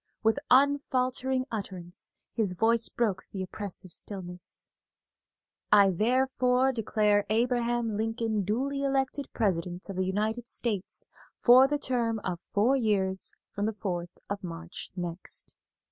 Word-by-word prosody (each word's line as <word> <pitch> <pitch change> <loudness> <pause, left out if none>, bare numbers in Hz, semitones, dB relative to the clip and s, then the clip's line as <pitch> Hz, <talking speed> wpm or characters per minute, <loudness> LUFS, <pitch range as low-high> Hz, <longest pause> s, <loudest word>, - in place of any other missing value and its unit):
With 225 -1 +3
unfaltering 260 -1 +3
utterance 190 -3 -5 0.2
his 210 -6 0
voice 225 +4 +3
broke 210 -6 -1
the 190 -2 -3
oppressive 185 -1 -6
stillness: 180 -1 -5 1.0
"I 200 -2 +7
therefore 255 +5 +2
declare 210 -3 +2
Abraham 240 0 +1
Lincoln 225 -1 0
duly 265 +8 -1
elected 270 0 0
President 180 -3 -1
of 195 - -4
the 185 0 +1
United 220 +5 -1
States 210 -6 -2 0.3
for 255 +2 +7
the 295 +1 0
term 240 -5 0
of 180 -2 -2
four 225 +6 +3
years 195 -6 +1 0.2
from 205 +1 -1
the 220 - -1
fourth 175 -4 -4
of 200 0 -4
March 170 -1 -7
next." 175 -1 -5
220 Hz, 125 wpm, -29 LUFS, 190-250 Hz, 1.0 s, I